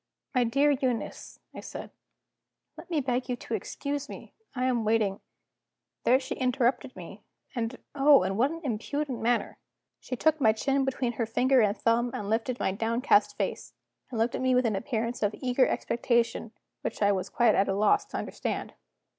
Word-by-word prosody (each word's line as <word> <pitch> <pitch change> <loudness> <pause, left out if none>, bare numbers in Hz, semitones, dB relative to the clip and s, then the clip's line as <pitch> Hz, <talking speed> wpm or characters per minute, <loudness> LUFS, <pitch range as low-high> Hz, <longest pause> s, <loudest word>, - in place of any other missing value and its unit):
"My 250 -2 +3
dear 275 +5 +3
Eunice," 255 -4 -2 0.2
I - - -8
said, - - -8 0.8
"let - - -12
me 320 -4 +1
beg 250 -1 -1
you 250 - 0
to - - -7
excuse 285 0 -3
me. - - -10 0.2
I 255 0 0
am 245 -3 +1
waiting 215 -3 +1 0.4
" - - -59
There 255 +2 +5
she 260 - -5
interrupted 255 0 0
me 185 +3 -10 0.3
and, 235 0 -3 0.2
oh, 280 -4 +6
in 190 +1 -1
what 250 +6 +3
an 330 +1 -6
impudent 265 +2 -3
manner! 235 +1 0 0.4
She 255 - -5
took 315 +4 +2
my 220 -3 +5
chin 270 +4 0
between 260 -2 -1
her 230 0 -2
finger 255 +3 +3
and 210 0 +2
thumb, 235 +1 +2
and 205 0 -4
lifted 235 +3 -1
my - - +1
downcast 230 - +2
face, - - -3 0.3
and 240 - -5
looked 230 +2 +1
at - - -3
me 260 -1 +3
with 250 0 +3
an 220 -3 +1
appearance 230 +3 -2
of 205 0 +1
eager 255 0 +2
expectation 235 -1 0 0.3
which - - -3
I 205 - +5
was 190 -2 -2
quite 235 -3 +3
at 195 - +2
a - - +2
loss 215 - +3
to - - -6
understand. - - -4
245 Hz, 190 wpm, -28 LUFS, 225-265 Hz, 0.8 s, oh